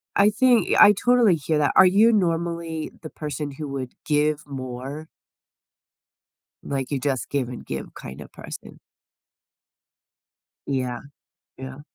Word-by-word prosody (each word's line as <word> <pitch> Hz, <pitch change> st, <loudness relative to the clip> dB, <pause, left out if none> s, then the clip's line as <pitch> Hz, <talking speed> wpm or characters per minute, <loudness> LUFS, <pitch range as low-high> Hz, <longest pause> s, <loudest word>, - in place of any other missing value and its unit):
I 200 Hz, +1 st, +5 dB
think 245 Hz, +2 st, +3 dB
I 210 Hz, -, +9 dB
totally 235 Hz, -3 st, +3 dB
hear 155 Hz, +1 st, -1 dB
that. 150 Hz, -1 st, +2 dB
Are 190 Hz, -, +8 dB
you 210 Hz, +5 st, +5 dB
normally 170 Hz, -4 st, -1 dB
the 155 Hz, -, -8 dB
person 150 Hz, -1 st, -5 dB
who 145 Hz, +2 st, -7 dB
would 130 Hz, -2 st, -5 dB
give 150 Hz, 0 st, +1 dB
more? 135 Hz, +3 st, -6 dB, 1.6 s
Like, 135 Hz, 0 st, -3 dB
you 140 Hz, -, -1 dB
just 130 Hz, -4 st, -2 dB
give 135 Hz, -4 st, -1 dB
and 125 Hz, -, -8 dB
give -, -, -5 dB
kinda 65 Hz, +3 st, -9 dB
person. -, -, -10 dB, 1.9 s
Yeah. 130 Hz, -3 st, -2 dB, 0.6 s
Yeah. 130 Hz, +2 st, -8 dB
150 Hz, 125 wpm, -23 LUFS, 135-170 Hz, 1.9 s, I